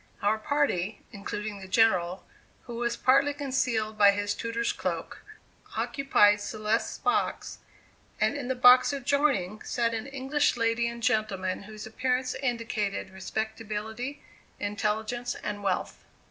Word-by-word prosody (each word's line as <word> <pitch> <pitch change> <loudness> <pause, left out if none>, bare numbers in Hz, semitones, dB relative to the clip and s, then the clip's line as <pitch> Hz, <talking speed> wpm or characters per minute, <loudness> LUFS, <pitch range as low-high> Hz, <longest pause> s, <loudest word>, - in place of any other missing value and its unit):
Our 215 +2 +2
party, 215 -7 0
including 205 +1 -5
the 190 - -9
General, 185 -4 +2 0.4
who 235 -1 -7
was 235 0 -1
partly 275 +2 +3
concealed 250 -6 -1
by 205 -1 +8
his 205 +1 0
tutor's 230 0 -2
cloak, - - -4 0.6
occupied 210 -7 +3
Celeste's 215 +2 -1
box, 415 +1 -1 0.6
and - - +2
in 280 -4 -4
the 260 - 0
box 250 +1 +7
adjoining 275 -8 +1
sat 235 -2 -1
an 225 +3 -3
English 275 0 0
lady 230 0 +1
and 235 0 -6
gentleman 215 -6 0
whose 215 -1 -8
appearance 255 +3 -1
indicated 230 -7 -2
respectability, 220 +6 -4 0.4
intelligence 215 +4 -2
and 205 -1 -5
wealth. 195 -2 -2
225 Hz, 125 wpm, -28 LUFS, 210-255 Hz, 0.6 s, by